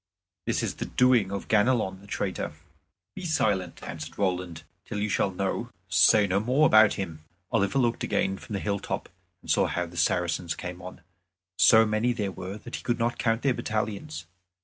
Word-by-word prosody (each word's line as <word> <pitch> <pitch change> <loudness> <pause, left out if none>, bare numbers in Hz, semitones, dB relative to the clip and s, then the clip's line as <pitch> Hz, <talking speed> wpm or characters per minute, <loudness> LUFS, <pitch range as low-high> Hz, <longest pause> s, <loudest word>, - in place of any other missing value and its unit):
This - - 0
is - - -3
the - - -4
doing 125 -6 +3
of 100 - -4
Ganelon 105 -3 +2
the 100 - -15
traitor." - - -3 0.6
"Be 190 - -8
silent," 105 - 0
answered 80 -1 -7
Roland, 90 -4 -2 0.2
"till 105 - -6
you 105 +1 -1
shall 100 - +1
know; 95 +1 -2 0.2
say 105 -1 +5
no 95 0 +1
more 130 +8 +3
about 110 -5 +6
him." 80 -5 -5 0.3
Oliver 100 +6 +1
looked 120 -3 +1
again 95 0 0
from - - -9
the 100 - -1
hilltop, 100 0 -3 0.3
and - - -3
saw - - +3
how 90 - -2
the 85 0 -11
Saracens 85 0 0
came 90 0 -7
on. 90 0 -10 0.6
So 110 0 +7
many 110 +3 +1
there 105 -4 -2
were 95 +2 -7
that 120 +3 -7
he - - -9
could 120 - 0
not 120 0 -1
count 115 0 +1
their 135 -2 +3
battalions. 100 -9 -3
100 Hz, 185 wpm, -27 LUFS, 90-115 Hz, 0.6 s, So